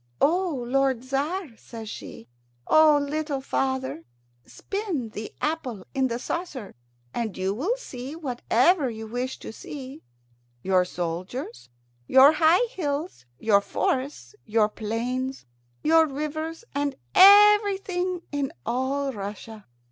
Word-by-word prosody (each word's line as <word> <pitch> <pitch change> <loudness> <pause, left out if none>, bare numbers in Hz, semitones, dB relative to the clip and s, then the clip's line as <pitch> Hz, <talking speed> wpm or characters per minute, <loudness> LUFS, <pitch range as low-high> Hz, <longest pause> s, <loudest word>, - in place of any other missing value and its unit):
"O 325 -5 +1
lord 265 -1 +1
Tzar," 280 +2 -2
says 225 -1 -10
she, 115 - -9 0.4
"O 310 -1 +6
little 290 0 -2
father, 265 -8 -2 0.4
spin 375 - -4
the 215 0 -7
apple 265 - -3
in 265 -2 +2
the 235 -1 -2
saucer, 265 - -5 0.4
and 225 -5 -3
you 190 +1 -1
will 355 - -1
see 265 - -8
whatever 270 +1 +2
you 220 -1 -7
wish 245 +4 -4
to - - -9
see 275 +3 -9 0.6
your 185 -1 +3
soldiers, 180 - -5 0.4
your 265 +2 +8
high 325 +8 +4
hills, 300 - -4
your 200 +2 +3
forests, 265 - -2
your 215 -1 +2
plains, 245 - -3 0.4
your 320 +1 +5
rivers, 310 +5 -4
and 285 0 -1 0.2
Everything 390 -3 +5
in 285 -2 -2
all 270 +2 -1
Russia." 205 +1 -8
270 Hz, 115 wpm, -25 LUFS, 230-320 Hz, 0.6 s, your